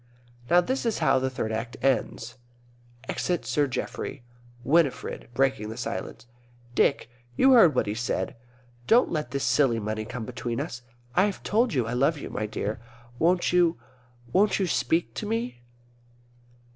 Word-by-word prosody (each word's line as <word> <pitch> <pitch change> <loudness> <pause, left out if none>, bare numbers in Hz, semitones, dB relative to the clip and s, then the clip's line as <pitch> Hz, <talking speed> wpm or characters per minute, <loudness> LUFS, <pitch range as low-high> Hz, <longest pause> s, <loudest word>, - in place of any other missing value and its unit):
Now 175 +1 +6
this 260 +9 -2
is 230 -2 0
how 130 - +3
the 130 0 0
Third 125 -4 -3
Act 115 +1 -4
ends: 120 -2 -1 0.7
Exit 175 -2 -1
Sir 145 -1 +1
Geoffrey. 130 0 -5 0.4
Winifred 150 -4 +1
(breaking 135 -5 +1
the 110 - -7
silence). 120 - -5 0.5
Dick, 135 - +2 0.3
you 265 - +6
heard 200 - +7
what - - +2
he 105 - -2
said. 115 +3 -2 0.5
Don't 240 +2 +5
let 150 -6 -2
this 140 +2 -2
silly 125 -6 +3
money 110 0 -3
come 120 0 -6
between 120 -1 -4
us. 120 - -5 0.3
I 185 - +5
have 205 -2 -4
told 225 -3 +1
you 125 -3 +1
I 115 - -3
love 140 +6 +2
you, - - -7 0.2
dear. 105 0 -3 0.4
Won't 175 +2 +2
you 175 -2 +4 0.6
won't 205 +1 +4
you 195 - +1
speak 160 +1 0
to 210 - -5
me? 225 - -3
135 Hz, 160 wpm, -26 LUFS, 120-180 Hz, 0.7 s, heard